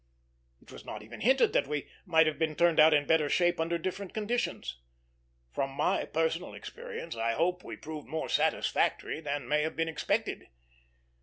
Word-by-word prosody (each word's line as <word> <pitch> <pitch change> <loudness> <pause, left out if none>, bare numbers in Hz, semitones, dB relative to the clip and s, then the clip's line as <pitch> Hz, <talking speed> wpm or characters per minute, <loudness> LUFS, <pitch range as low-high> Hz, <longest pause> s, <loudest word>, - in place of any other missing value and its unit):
It - - -16
was - - -11
not - - -7
even 115 +3 -10
hinted 260 +4 +4
that - - +2
we 150 -1 -3 0.2
might 160 -2 +5
have 155 -1 -1
been 160 -1 0
turned 170 -1 +3
out 155 +1 +8
in 145 -1 +3
better 155 -1 +3
shape 175 +1 +2
under 165 +1 0
different 185 +2 -5
conditions. 215 - -2 0.7
From 135 - -1
my - - +1
personal 165 +2 -1
experience, 475 - -7
I 115 0 0
hope 180 +7 0
we - - -7
proved 155 -1 -8
more 160 0 -3
satisfactory 155 - +1
than 145 -4 -3
may 150 +3 +2
have 160 +1 -2
been 165 +1 0
expected. 160 - -1
160 Hz, 175 wpm, -30 LUFS, 150-175 Hz, 0.7 s, out